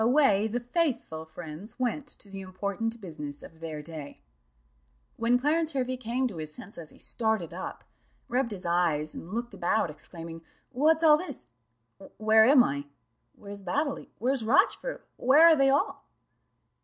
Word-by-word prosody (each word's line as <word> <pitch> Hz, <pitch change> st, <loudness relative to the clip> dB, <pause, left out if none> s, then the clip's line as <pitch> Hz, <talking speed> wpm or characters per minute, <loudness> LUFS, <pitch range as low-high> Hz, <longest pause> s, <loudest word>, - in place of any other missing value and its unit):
Away 225 Hz, -5 st, +4 dB
the 235 Hz, +3 st, -2 dB
faithful 245 Hz, -, -1 dB
friends 160 Hz, +5 st, -9 dB
went 260 Hz, +3 st, -1 dB
to 215 Hz, -, -12 dB
the 195 Hz, 0 st, -6 dB
important 200 Hz, +5 st, -3 dB
business 150 Hz, -6 st, -7 dB
of 165 Hz, -, -13 dB
their 155 Hz, -2 st, -6 dB
day. 150 Hz, -, -9 dB, 1.0 s
When 235 Hz, +2 st, +3 dB
Clarence 315 Hz, +5 st, +1 dB
Hervey 255 Hz, -1 st, -1 dB
came 250 Hz, +2 st, -1 dB
to 200 Hz, -8 st, -7 dB
his 155 Hz, -1 st, -5 dB
senses 170 Hz, -1 st, -9 dB
he -, -, -18 dB
started 220 Hz, -8 st, -1 dB
up, 185 Hz, -, -6 dB, 0.4 s
rubbed 250 Hz, 0 st, 0 dB
his 195 Hz, -5 st, -7 dB
eyes, 170 Hz, -3 st, +1 dB
and 170 Hz, -, -9 dB
looked 235 Hz, +1 st, -3 dB
about, 185 Hz, -1 st, +1 dB
exclaiming 165 Hz, +2 st, -8 dB, 0.3 s
"What's 315 Hz, +5 st, +3 dB
all 305 Hz, -2 st, +8 dB
this? 365 Hz, -, -6 dB, 0.7 s
Where 220 Hz, 0 st, +6 dB
am 260 Hz, 0 st, +7 dB
I? 140 Hz, -4 st, -2 dB, 0.5 s
Where's 200 Hz, 0 st, -9 dB
Baddely? 280 Hz, -, -2 dB
Where's 255 Hz, +1 st, 0 dB
Rochfort? 285 Hz, -, +2 dB
Where 280 Hz, +6 st, +6 dB
are 335 Hz, -1 st, +8 dB
they 275 Hz, -2 st, +4 dB
all?" 280 Hz, +1 st, +1 dB
220 Hz, 155 wpm, -28 LUFS, 170-260 Hz, 1.0 s, all